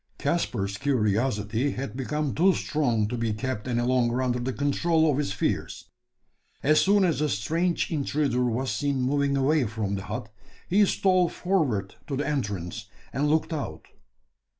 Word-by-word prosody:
Caspar's 100 - -1
curiosity 115 -1 0
had 135 -1 -5
become 145 +2 -2
too 185 +4 +4
strong 120 -8 0
to 120 - -3
be 115 -2 -1
kept 110 +1 -4
any 120 -1 0
longer 125 0 +1
under 125 -1 0
the 125 +2 -2
control 160 +4 +2
of 140 - 0
his 145 - -1
fears. 100 - -3 0.7
As 155 +2 +5
soon 200 0 +4
as 165 -5 +1
the 150 0 +1
strange 165 - 0
intruder 140 -4 0
was 125 +2 -1
seen 140 -2 -1
moving 140 +2 +1
away 140 +1 +2
from 105 -2 -3
the 95 0 -4
hut, 110 +1 -6 0.3
he 205 +4 +4
stole 185 -3 +3
forward 135 - -1
to 140 - -2
the 145 - -1
entrance, 100 - -3 0.3
and 145 +3 +1
looked 160 +2 +1
out. 150 -3 -5
135 Hz, 160 wpm, -26 LUFS, 115-150 Hz, 0.7 s, As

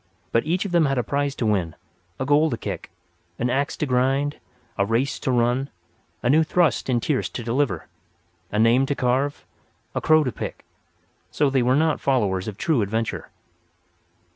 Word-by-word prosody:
But 115 +6 +1
each 180 +5 0
of 200 - -4
them 170 -3 +4
had 135 -1 0
a 125 - +1
prize 140 +1 -1
to 120 - -2
win, 90 -6 0 0.4
a 130 - -1
goal 145 +3 +4
to 120 - -2
kick, - - -6 0.5
an 120 +1 0
axe 140 +3 -1
to - - -1
grind, 135 +2 +1 0.4
a 100 - +1
race 115 +7 0
to - - -3
run, 125 +3 +1 0.5
a - - +1
new 160 +2 +5
thrust 160 -4 +1
in 120 -2 +2
tierce 135 +3 -1
to 120 - -6
deliver, 125 +5 0 0.7
a 105 - -2
name 115 +5 +4
to 140 - -1
carve, 135 +3 0 0.5
a - - -2
crow 155 0 +5
to 130 - -1
pick—so 140 +3 -5
they 135 -1 +2
were 125 +2 +3
not 155 +1 +1
followers 100 -8 +1
of 105 -2 -5
true 155 - +1
adventure. 110 +3 -2
130 Hz, 180 wpm, -23 LUFS, 115-145 Hz, 0.7 s, new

